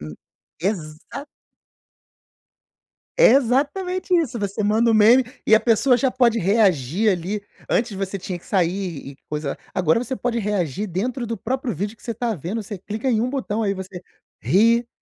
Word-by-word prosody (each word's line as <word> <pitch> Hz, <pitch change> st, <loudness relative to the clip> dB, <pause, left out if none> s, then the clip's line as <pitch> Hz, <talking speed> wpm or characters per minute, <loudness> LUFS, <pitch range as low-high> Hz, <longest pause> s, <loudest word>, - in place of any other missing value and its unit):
hum, 75 Hz, 0 st, -8 dB, 0.5 s
exa 180 Hz, -, -4 dB, 1.9 s
É -, -, +7 dB
exatamente 295 Hz, +9 st, +1 dB
isso, 280 Hz, -10 st, +1 dB
você 200 Hz, +1 st, -2 dB
manda 220 Hz, +3 st, +3 dB
um -, -, +2 dB
meme 230 Hz, +5 st, +6 dB, 0.2 s
e 220 Hz, -, +3 dB
a 220 Hz, -, +8 dB
pessoa 245 Hz, +2 st, +3 dB
já 265 Hz, 0 st, +1 dB
pode 240 Hz, -3 st, +2 dB
reagir 195 Hz, -, +2 dB
ali. 190 Hz, +3 st, -3 dB, 0.3 s
Antes 235 Hz, 0 st, +1 dB
você 195 Hz, 0 st, -3 dB
tinha 180 Hz, -1 st, -6 dB
que -, -, -22 dB
sair 180 Hz, -5 st, -1 dB
e 140 Hz, -, -12 dB
coisa 150 Hz, -2 st, -3 dB, 0.2 s
agora 180 Hz, +2 st, +2 dB
você 250 Hz, +2 st, -3 dB
pode 240 Hz, -1 st, -2 dB
reagir 205 Hz, -, -2 dB
dentro 240 Hz, +8 st, -3 dB
do 230 Hz, -1 st, -3 dB
próprio 250 Hz, +2 st, -3 dB
vídeo 205 Hz, +7 st, -4 dB
que -, -, -23 dB
você 235 Hz, -, -3 dB
está 230 Hz, +1 st, -2 dB
vendo. 195 Hz, +8 st, -4 dB
Você 205 Hz, 0 st, -7 dB
clica 215 Hz, +7 st, -4 dB
em 225 Hz, -, +2 dB
uma 245 Hz, +3 st, 0 dB
botão 245 Hz, -5 st, -2 dB
aí 200 Hz, -2 st, +1 dB
você 185 Hz, -1 st, -8 dB, 0.4 s
ri, 230 Hz, +5 st, +3 dB
215 Hz, 170 wpm, -22 LUFS, 185-240 Hz, 1.9 s, a